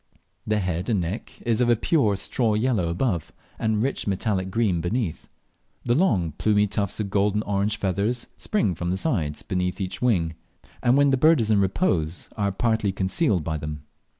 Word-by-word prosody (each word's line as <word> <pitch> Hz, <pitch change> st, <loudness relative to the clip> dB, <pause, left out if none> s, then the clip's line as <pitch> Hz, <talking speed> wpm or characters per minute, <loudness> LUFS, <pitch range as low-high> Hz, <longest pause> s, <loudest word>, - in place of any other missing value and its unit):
The 110 Hz, 0 st, +2 dB
head 90 Hz, -1 st, -2 dB
and 105 Hz, -4 st, +2 dB
neck 90 Hz, +7 st, -5 dB
is 115 Hz, 0 st, +1 dB
of 120 Hz, -, +3 dB
a 120 Hz, -, +5 dB
pure 110 Hz, -4 st, +2 dB
straw 110 Hz, +2 st, 0 dB
yellow 110 Hz, -5 st, +1 dB
above 85 Hz, -, -1 dB, 0.3 s
and 110 Hz, -1 st, +1 dB
rich 135 Hz, -4 st, -2 dB
metallic 95 Hz, -1 st, -1 dB
green 100 Hz, -5 st, +1 dB
beneath. 90 Hz, -1 st, -2 dB, 0.6 s
The 120 Hz, -, +2 dB
long 105 Hz, -, +2 dB
plumy 105 Hz, -1 st, +3 dB
tufts 100 Hz, -1 st, -2 dB
of 100 Hz, -2 st, -3 dB
golden 105 Hz, +1 st, +1 dB
orange 100 Hz, +1 st, 0 dB
feathers 105 Hz, +5 st, -1 dB
spring 205 Hz, -, 0 dB
from 85 Hz, +1 st, -4 dB
the 95 Hz, -, 0 dB
sides 80 Hz, -, -1 dB
beneath 90 Hz, 0 st, -2 dB
each 95 Hz, -1 st, -4 dB
wing, 90 Hz, -10 st, +2 dB, 0.5 s
and 125 Hz, +2 st, +4 dB
when 140 Hz, -1 st, +4 dB
the 135 Hz, -, +3 dB
bird 155 Hz, +2 st, +5 dB
is 110 Hz, -1 st, +1 dB
in 105 Hz, -, +4 dB
repose 90 Hz, -, 0 dB
are 100 Hz, -2 st, 0 dB
partly 110 Hz, 0 st, 0 dB
concealed 95 Hz, -, +1 dB
by 80 Hz, 0 st, -2 dB
them. 75 Hz, -1 st, -6 dB
100 Hz, 180 wpm, -24 LUFS, 90-115 Hz, 0.6 s, a